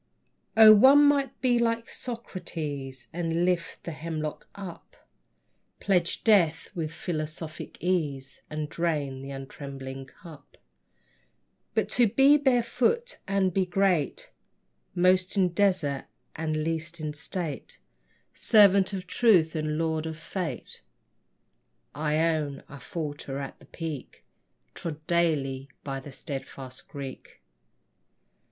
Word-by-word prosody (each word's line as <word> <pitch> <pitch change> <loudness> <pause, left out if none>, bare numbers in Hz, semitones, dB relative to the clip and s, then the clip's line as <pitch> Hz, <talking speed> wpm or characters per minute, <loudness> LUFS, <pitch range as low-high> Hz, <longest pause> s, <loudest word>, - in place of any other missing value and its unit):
O, 220 -1 +11
one 270 +7 +8
might 285 -1 +2
be 245 -2 +3
like 230 0 0
Socrates 150 - -5
And 170 0 0
lift 180 -2 -1
the 170 - -5
hemlock 155 -1 -5
up, 190 -4 -9 0.8
Pledge 180 -4 +1
death 175 -8 +3
with 160 -4 -3
philosophic 155 -2 -5
ease, 150 -7 -1
And 155 0 -3
drain 150 -5 -2
the 135 - -8
untrembling 135 -1 -7
cup; 155 +2 -15 1.2
But - - +2
to 245 -2 +4
be 270 +7 +6
barefoot 265 - +1
and 195 -2 +1
be 195 - +2
great, 180 -5 0 0.6
Most 185 +2 +3
in 185 -2 +4
desert 175 -7 +1 0.3
and 155 -1 -1
least 165 +1 -3
in 155 -1 -3
state, 150 +1 -4 0.6
Servant 200 -3 +5
of 185 -2 -4
truth 180 -6 +4
and 155 -1 -1
lord 160 -1 -1
of 160 -1 -5
fate! 180 - -5 1.1
I 150 +1 0 0.2
own 145 -3 -3
I 140 - -10
falter 145 -4 -5
at 140 -1 -6
the - - -17
peak 160 -5 -7 0.5
Trod 155 -2 -6
daily 140 -6 +1
by 135 -1 -4
the 140 +2 -10
steadfast 135 -2 -7
Greek. 140 -2 -9
165 Hz, 115 wpm, -27 LUFS, 145-195 Hz, 1.2 s, O